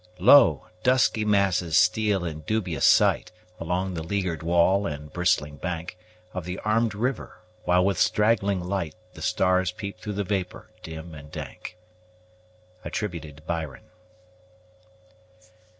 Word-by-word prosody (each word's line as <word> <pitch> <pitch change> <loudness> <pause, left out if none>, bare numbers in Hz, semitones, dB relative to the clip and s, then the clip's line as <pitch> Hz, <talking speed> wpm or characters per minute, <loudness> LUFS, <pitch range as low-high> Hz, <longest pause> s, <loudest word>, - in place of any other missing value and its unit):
Lo! 90 - +6 0.2
dusky 125 -3 +3
masses 95 -5 +2
steal 95 0 +2
in 80 -2 -5
dubious 95 -4 0
sight, - - +4 0.3
Along 90 +3 -2
the 80 - -4
leaguer'd 90 -1 -2
wall, 85 +4 +3
and 75 -1 -7
bristling 75 -5 0
bank, 85 +3 -5 0.4
Of 90 - -4
the 90 +3 -5
arm'd 110 0 +1
river; 125 +5 -3 0.3
while 90 +1 +3
with 100 -1 0
straggling 105 -3 +2
light, 90 -4 -3 0.2
The - - -12
stars 95 0 +2
peep 100 0 -7
through 105 +2 -5
the 100 +1 -1
vapor, 100 +2 -4
dim 80 0 -8
and 75 0 -11
dank. 90 - -8 1.1
BYRON. 80 -5 -5
90 Hz, 120 wpm, -25 LUFS, 80-100 Hz, 1.1 s, Lo